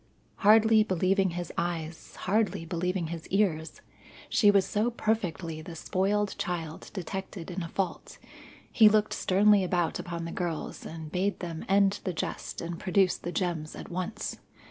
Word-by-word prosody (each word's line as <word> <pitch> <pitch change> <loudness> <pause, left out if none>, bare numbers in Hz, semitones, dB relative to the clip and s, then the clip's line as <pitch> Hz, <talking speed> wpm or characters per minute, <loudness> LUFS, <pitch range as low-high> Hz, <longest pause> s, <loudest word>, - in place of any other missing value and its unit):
Hardly 220 +1 +6
believing 190 0 +2
his 175 -2 -4
eyes, 165 -1 -4
hardly 205 -3 +1
believing 175 0 -2
his 165 -1 -7
ears, 180 -6 0 0.5
she 205 - +5
was 200 -2 +5
so 215 +3 +1
perfectly 180 -9 -2
the 165 +1 -9
spoiled 200 +4 0
child 165 -4 -4
detected 190 -1 -5
in 180 +2 -3
a 170 - -4
fault 185 -1 -3 0.5
he 220 -2 +7
looked 215 0 +2
sternly 200 +1 +4
about 175 -2 0
upon 170 -1 -4
the 165 - -5
girls 170 -4 -4
and 160 -1 -8
bade 195 +3 0
them 165 -2 -5
end 200 +1 +4
the 185 - -2
jest 160 - -4
and 170 0 -5
produce 185 0 +2
the 175 - -5
gems 170 -4 -2
at - - -9
once. 185 +5 -3
185 Hz, 155 wpm, -29 LUFS, 170-205 Hz, 0.5 s, he